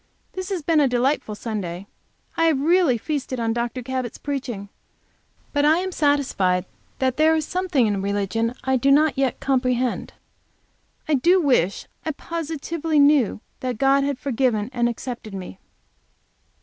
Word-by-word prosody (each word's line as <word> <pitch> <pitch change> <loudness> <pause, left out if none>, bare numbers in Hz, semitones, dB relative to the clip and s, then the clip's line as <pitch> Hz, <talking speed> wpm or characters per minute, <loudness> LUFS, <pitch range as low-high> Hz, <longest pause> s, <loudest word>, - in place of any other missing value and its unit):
This 375 0 -5
has 370 -5 -3
been 320 0 +3
a 285 - +4
delightful 250 -2 0
Sunday. 195 -5 -5 0.5
I 330 - +2
have 315 -4 +3
really 325 -3 +3
feasted 265 0 -3
on 225 -1 0
Dr. 240 +2 -3
Cabot's 255 -1 -4
preaching. 250 -8 -4 0.8
But 290 -1 +2
I 310 +2 +5
am 375 +1 -2
satisfied 255 - +1 0.3
that 260 -1 0
there 315 +1 +4
is 310 -1 0
something 360 -9 +1
in 205 -2 0
religion 205 +4 -1
I 265 0 +2
do 270 +3 +2
not 290 0 +4
yet 270 -2 0
comprehend. 255 -2 0 0.9
I 310 - +1
do 345 +7 +4
wish 245 - +1 0.2
I 315 - -2
positively 325 0 -3
knew 285 -7 +4 0.2
that 250 -3 -3
God 275 +2 +3
had 280 -1 -1
forgiven 250 -5 0
and 240 -1 +1
accepted 235 -3 -6
me. 180 - -8
265 Hz, 150 wpm, -23 LUFS, 230-300 Hz, 0.9 s, I